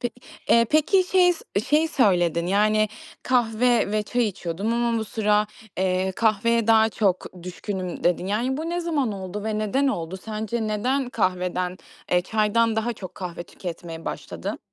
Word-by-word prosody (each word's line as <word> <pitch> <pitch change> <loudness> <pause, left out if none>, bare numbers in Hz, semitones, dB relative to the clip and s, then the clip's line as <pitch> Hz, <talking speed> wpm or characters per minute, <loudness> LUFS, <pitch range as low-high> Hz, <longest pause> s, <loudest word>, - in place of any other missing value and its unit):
Pe 240 - -1 0.4
eee, 230 0 +5
peki 310 +5 +4
şey 360 -1 +4 0.3
şey 310 +2 +3
söyledin, 175 - +2
yani, 215 +2 +3 0.3
"Kahve 240 -2 +2
ve 215 - +1
çay 240 +3 0
içiyordum 190 +3 -3
ama 235 -1 +1
bu 220 - -2
sıra, 210 -1 +1 0.3
eee, 185 0 +1
kahveye 225 +2 +2
daha 225 -1 +5
çok 185 -4 -1
düşkünüm." 185 0 -5
dedin. 175 +1 +2
Yani, 235 +7 0
bu 320 +2 -3
ne 350 +1 -1
zaman 300 -9 0
oldu 195 +1 -6
ve 215 -1 -1
neden 215 +7 +1
oldu? 170 -6 -3
Sence 220 +3 -3
neden 245 +5 0
kahveden, 180 -3 -1 0.3
eee, 180 - +4
çaydan 220 +2 +1
daha 235 +2 0
çok 185 -4 -9
kahve 175 -2 -6
tüketmeye 165 -2 -8
başladın? - - -5
215 Hz, 155 wpm, -24 LUFS, 185-235 Hz, 0.4 s, eee